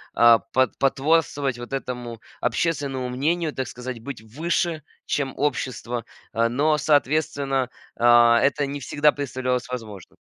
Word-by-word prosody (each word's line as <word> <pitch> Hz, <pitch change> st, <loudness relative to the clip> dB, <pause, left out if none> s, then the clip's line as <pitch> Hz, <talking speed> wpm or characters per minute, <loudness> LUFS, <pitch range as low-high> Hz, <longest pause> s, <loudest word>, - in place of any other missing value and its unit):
а, 115 Hz, -1 st, +7 dB
по 130 Hz, 0 st, +1 dB
потворствовать 140 Hz, -2 st, +1 dB
вот 120 Hz, +2 st, -8 dB
этому 125 Hz, -3 st, -4 dB, 0.2 s
общественному 140 Hz, -6 st, -1 dB
мнению, 155 Hz, +5 st, 0 dB
так 130 Hz, -, -3 dB
сказать, 125 Hz, -1 st, -7 dB
быть 125 Hz, -1 st, -7 dB
выше, 160 Hz, -, -1 dB, 0.2 s
чем 135 Hz, -2 st, -1 dB
общество. 125 Hz, -4 st, -2 dB, 0.3 s
Э, 115 Hz, +1 st, +2 dB
но, 150 Hz, +5 st, +2 dB
соответственно, 140 Hz, -3 st, +1 dB, 0.3 s
а, 120 Hz, 0 st, +6 dB
это 145 Hz, +1 st, +2 dB
не 140 Hz, +1 st, -5 dB
всегда 145 Hz, +2 st, +2 dB
представлялось 130 Hz, -3 st, -2 dB
возможным. 110 Hz, -7 st, -8 dB
135 Hz, 130 wpm, -24 LUFS, 120-145 Hz, 0.3 s, а